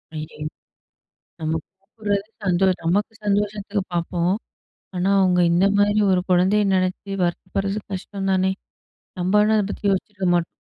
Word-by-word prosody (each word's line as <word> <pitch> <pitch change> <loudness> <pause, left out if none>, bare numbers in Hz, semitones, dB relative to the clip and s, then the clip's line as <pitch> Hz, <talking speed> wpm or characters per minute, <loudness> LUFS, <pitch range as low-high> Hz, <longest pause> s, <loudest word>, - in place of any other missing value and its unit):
ஐயோ! 155 0 -7 1.0
நம்ம 160 0 -1 0.2
சாப்டுறது 200 0 -3 0.2
சந்தோஷ் 185 0 +2
நமக்கு 200 +7 +1
சந்தோஷத்துக்கு 205 0 0
பார்ப்போம். 175 +1 0 0.6
ஆனா 180 +2 +1
அவுங்க 180 -2 +3
இந்த 175 +3 +4
மாரி 205 +1 +3
ஒரு 185 -1 +3
கொழந்தைய 185 +4 +4
நெனச்சி 185 +2 -1
வருத்தப்பட்றது 195 +3 -2
கஷ்டம் 195 +1 -4
தானே! 190 0 +2 0.7
நம்ப 185 +3 0
ஆனா 215 +1 +3
அத 210 - +2
பத்தி - - -7
யோசிச்சிருக்க 195 0 -2
மாட்டோம். 170 -1 +2
190 Hz, 130 wpm, -22 LUFS, 180-205 Hz, 1.0 s, இந்த